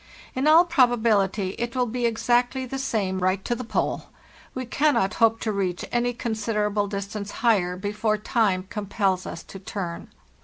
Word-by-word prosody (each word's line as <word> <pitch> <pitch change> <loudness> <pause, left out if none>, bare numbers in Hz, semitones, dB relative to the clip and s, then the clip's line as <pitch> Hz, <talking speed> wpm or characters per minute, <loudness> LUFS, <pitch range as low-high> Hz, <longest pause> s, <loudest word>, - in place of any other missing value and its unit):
In 260 +3 0
all 325 +3 +7
probability 225 - +2
it 235 +1 -3
will 250 -1 +2
be 240 +1 -1
exactly 245 +3 +1
the 270 +2 -5
same 205 -8 -1
right 185 +1 0
to - - 0
the 250 - -4
Pole. 235 - -1 0.5
We 255 0 -3
cannot 255 -6 +2
hope 225 0 +5
to 220 - -1
reach 185 -3 -2
any 240 0 +1
con 235 -1 -3
siderable 210 -2 -1
distance 200 +1 -5 0.2
higher 180 -6 +3
before 210 +2 -1
time 210 -3 +1
compels 195 -2 -1
us 165 - -7
to 195 - -10
turn. 185 -3 -5
215 Hz, 165 wpm, -25 LUFS, 195-245 Hz, 0.5 s, all